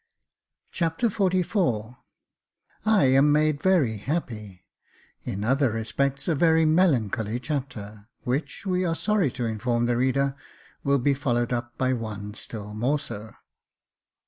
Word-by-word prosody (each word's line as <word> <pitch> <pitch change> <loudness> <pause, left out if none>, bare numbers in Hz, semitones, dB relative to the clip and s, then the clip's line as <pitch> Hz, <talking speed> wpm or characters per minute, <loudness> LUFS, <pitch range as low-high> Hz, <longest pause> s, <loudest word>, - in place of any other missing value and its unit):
Chapter 170 +7 0
XLIV 180 - 0 0.9
I 215 -5 +5
am 135 +3 +5
made 150 -1 +2
very 160 - +3
happy 105 - -4 0.3
— - - -33
In 100 +2 -3
other 130 +2 +2
respects 115 +5 -1
a 170 - +3
very 160 +1 +4
melancholy 125 - +2
chapter, 120 -7 -5 0.2
which, 135 +10 -3
we 185 -1 +1
are 165 -2 0
sorry 210 -5 +1
to 120 - -3
inform 120 +2 0
the 120 0 +1
reader, 135 +2 +1 0.5
will 140 0 +3
be 140 +2 +2
followed 120 -3 0
up 120 0 -4
by 130 0 +1
one 105 -4 -5
still 105 -2 -8
more 125 +8 +1
so. 110 -7 -7
130 Hz, 135 wpm, -26 LUFS, 110-155 Hz, 0.9 s, I